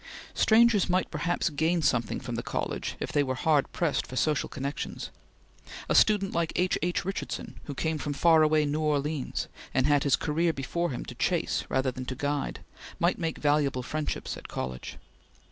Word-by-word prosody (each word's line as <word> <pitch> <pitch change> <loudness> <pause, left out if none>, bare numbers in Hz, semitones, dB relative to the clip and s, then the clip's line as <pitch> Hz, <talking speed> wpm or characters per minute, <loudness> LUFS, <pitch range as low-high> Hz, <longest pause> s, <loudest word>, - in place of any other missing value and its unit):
Strangers 220 -3 +4
might 185 +1 +1
perhaps 165 +2 0
gain 160 +3 +1
something 120 -5 +1
from - - -6
the - - -2
college - - -3
if - - -3
they 145 - +3
were 130 -2 -1
hard 150 0 +2
pressed 165 -5 0
for 130 - -8
social 150 +2 +1
connections. 140 +2 -5 0.8
A - - +1
student 205 -3 +4
like 170 -1 0
H. 180 +1 +2
H. 175 0 -1
Richardson, 195 +1 -4
who 145 - -6
came 160 +3 -1
from 145 0 -3
far 160 +3 +5
away 155 0 +4
New 150 +2 -1
Orleans, 150 -1 -1 0.3
and 130 0 +3
had 145 -1 +4
his 140 -4 +4
career 165 +4 0
before 170 +6 -2
him 125 - -5
to - - -7
chase - - 0
rather 130 0 +1
than 130 0 -6
to 130 - -4
guide, 145 +1 -2 0.4
might 175 +2 +1
make 165 -2 -2
valuable 145 -3 +1
friendships 155 +4 -3
at - - -10
college. 65 -1 -5
150 Hz, 180 wpm, -28 LUFS, 140-170 Hz, 0.8 s, far